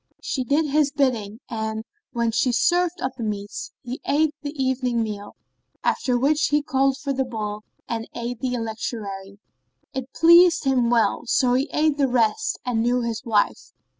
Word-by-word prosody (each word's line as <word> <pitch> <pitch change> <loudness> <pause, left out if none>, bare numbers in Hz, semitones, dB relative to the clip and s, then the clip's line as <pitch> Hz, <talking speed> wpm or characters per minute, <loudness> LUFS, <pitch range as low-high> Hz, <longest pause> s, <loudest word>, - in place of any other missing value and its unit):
She 265 -3 -2
did 285 +6 +2
his 295 0 +2
bidding 240 -6 -1
and, 220 -1 -3 0.3
when 235 -2 0
she 235 +2 +2
served 350 +7 +2
up 260 - -1
the 235 - -4
meats, 205 -2 -4
he 250 +1 -6
ate 305 +1 +2
the 290 - -4
evening 255 -3 0
meal, 205 -2 -6 0.5
after 250 -2 +1
which 290 +5 +2
he 295 0 +1
called 275 -2 +1
for 275 0 -3
the 265 0 0
bowl 215 -4 -4 0.3
and 225 -1 -4
ate 240 +1 -4
of - - -33
the 255 -1 -1
electuary. 215 -4 -5 0.6
It 265 -1 -5
pleased 340 +1 +6
him 260 -4 +2
well, 235 0 +2
so 245 +1 +3
he 265 +4 +1
ate 305 -1 +2
the 280 -2 +3
rest 245 - +1
and 240 -3 0
knew 245 +2 +2
his 230 0 -3
wife. 215 -3 0
250 Hz, 175 wpm, -23 LUFS, 225-280 Hz, 0.6 s, pleased